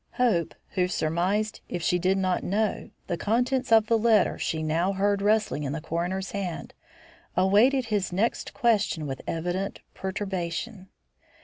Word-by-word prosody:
Hope, 220 Hz, -10 st, +1 dB
who 180 Hz, -2 st, 0 dB
surmised, 185 Hz, +6 st, -1 dB
if 175 Hz, -2 st, -4 dB
she 180 Hz, -, +2 dB
did 185 Hz, +2 st, +2 dB
not 185 Hz, -1 st, 0 dB
know, 210 Hz, +2 st, -1 dB, 0.2 s
the 175 Hz, -, -2 dB
contents 250 Hz, +5 st, 0 dB
of 220 Hz, -1 st, +6 dB
the 225 Hz, 0 st, +2 dB
letter 225 Hz, -1 st, +3 dB
she 160 Hz, -1 st, -2 dB
now 165 Hz, +5 st, +1 dB
heard 200 Hz, +1 st, +1 dB
rustling 210 Hz, -6 st, +2 dB
in 140 Hz, -1 st, -2 dB
the -, -, -3 dB
coroner's 180 Hz, +5 st, -3 dB
hand, 185 Hz, -5 st, -4 dB, 0.6 s
awaited 220 Hz, +8 st, +4 dB
his 205 Hz, -5 st, -1 dB
next 205 Hz, +6 st, -1 dB
question 215 Hz, -, +1 dB
with 135 Hz, -2 st, -5 dB
evident 175 Hz, +4 st, -2 dB
perturbation. 190 Hz, +1 st, -4 dB
190 Hz, 145 wpm, -26 LUFS, 175-215 Hz, 0.6 s, of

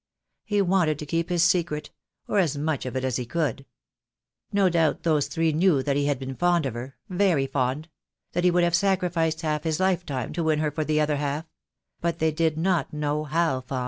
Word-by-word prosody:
He 205 Hz, -2 st, +1 dB
wanted 175 Hz, -5 st, +2 dB
to 150 Hz, -, -6 dB
keep 165 Hz, +3 st, -1 dB
his 175 Hz, -1 st, +2 dB
secret, 170 Hz, -4 st, +1 dB, 0.4 s
or 205 Hz, -, +1 dB
as 155 Hz, -6 st, +1 dB
much 150 Hz, -3 st, -2 dB
of 125 Hz, -, -5 dB
it 130 Hz, -, -1 dB
as 130 Hz, -2 st, 0 dB
he 125 Hz, -, -3 dB
could. 140 Hz, -3 st, -2 dB, 0.8 s
No 200 Hz, -1 st, +3 dB
doubt 165 Hz, -3 st, +1 dB
those 155 Hz, -4 st, +2 dB
three 165 Hz, -1 st, 0 dB
knew 160 Hz, -4 st, +3 dB
that 140 Hz, 0 st, 0 dB
he 145 Hz, 0 st, +1 dB
had 145 Hz, -2 st, +1 dB
been 135 Hz, +1 st, -5 dB
fond 175 Hz, +1 st, +2 dB
of 130 Hz, -, -2 dB
her, 125 Hz, +3 st, -7 dB
very 180 Hz, -7 st, +2 dB
fond; 135 Hz, +3 st, -1 dB, 0.4 s
that 175 Hz, -, -1 dB
he 180 Hz, -, +5 dB
would 175 Hz, 0 st, +3 dB
have 170 Hz, -1 st, +2 dB
sacrificed 175 Hz, -3 st, +1 dB
half 155 Hz, -2 st, -1 dB
his 160 Hz, 0 st, -1 dB
lifetime 175 Hz, -9 st, -1 dB
to 170 Hz, -, -2 dB
win 155 Hz, -1 st, +2 dB
her 150 Hz, -1 st, 0 dB
for 155 Hz, +2 st, -2 dB
the 155 Hz, 0 st, +1 dB
other 150 Hz, -1 st, +1 dB
half; 145 Hz, +2 st, -2 dB, 0.5 s
but 170 Hz, -1 st, -1 dB
they 160 Hz, -1 st, +1 dB
did 160 Hz, 0 st, 0 dB
not 175 Hz, +1 st, 0 dB
know 150 Hz, 0 st, -2 dB
how 155 Hz, -4 st, 0 dB
fond. 130 Hz, +1 st, -4 dB
155 Hz, 215 wpm, -25 LUFS, 145-175 Hz, 0.8 s, he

